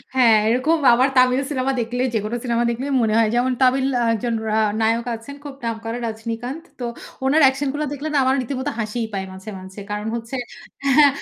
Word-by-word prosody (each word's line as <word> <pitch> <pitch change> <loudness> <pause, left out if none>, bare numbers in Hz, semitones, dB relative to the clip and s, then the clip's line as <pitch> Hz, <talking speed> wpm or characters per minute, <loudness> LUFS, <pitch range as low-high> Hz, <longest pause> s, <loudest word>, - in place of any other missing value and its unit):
হ্যা, 260 - +4 0.2
এরকম 255 +8 +2 0.2
আবার 255 +3 +4
তামিল 255 +1 +5
সিনেমা 265 -1 0
দেখলে, 245 +2 -2
যেকোনো 215 +2 -1
সিনেমা 235 -1 +1
দেখলেই 260 +4 -2
মনে 220 -2 +1
হয়। 225 -1 +4
যেমন 250 +2 +2
তামিল 260 +1 +4 0.3
একজন 230 +2 -2
রা 215 0 +1 0.2
নায়ক 230 +1 +1
আছেন, 230 +5 -10
খুব 285 -2 -8
নাম 230 -1 -1
করা, 230 +1 -3
রজনীকান্ত। 230 +7 -5 0.2
তো 245 - -3 0.4
ওনার 295 +4 +4
অ্যাকশন 270 +2 +2
গুলো 300 +1 -2
দেখলে 290 +2 -5
না, - - +2
আমার 260 +1 +3
রীতিমতো 260 +3 -3
হাসিই 225 +1 -2
পায় 190 -1 -2
মাঝে, 190 +3 -9
মাঝে। 190 +2 -10
কারণ 210 +1 -3
হচ্ছে 235 +3 -5 0.6
হ্যা, 295 -1 +8
245 Hz, 195 wpm, -21 LUFS, 225-270 Hz, 0.6 s, হ্যা